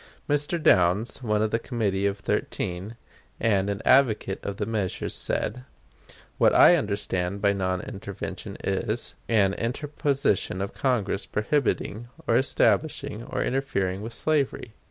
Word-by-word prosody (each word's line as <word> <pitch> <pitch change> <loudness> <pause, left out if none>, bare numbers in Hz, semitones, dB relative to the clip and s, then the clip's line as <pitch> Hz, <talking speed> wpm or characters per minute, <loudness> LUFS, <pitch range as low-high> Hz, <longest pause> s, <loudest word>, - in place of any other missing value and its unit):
Mr. 145 +4 +2
Downs, 95 - +3
one 105 -3 +1
of 110 - 0
the 115 - +1
Committee 100 -5 -1
of 100 0 -2
Thirteen, 95 +1 -3 0.4
and 100 -3 +2
an 100 +1 -3
advocate 115 -7 +3
of 100 -1 -4
the 105 - -1
measures, 105 -4 -2
said: 125 +4 -3 0.8
"What - - +5
I 175 - +8
understand 100 - -1
by 100 0 +3
non 95 -2 -1
intervention 100 0 -7
is, 105 +4 -1 0.2
an 100 -4 +3
interposition 135 - -1
of 100 0 -3
Congress 105 -7 0
prohibiting, 120 -1 -1 0.2
or 115 - +2
establishing, 140 -1 +1
or - - -2
interfering 100 -8 -1
with 115 +2 -6
slavery." 140 -6 -1
105 Hz, 135 wpm, -26 LUFS, 100-125 Hz, 0.8 s, I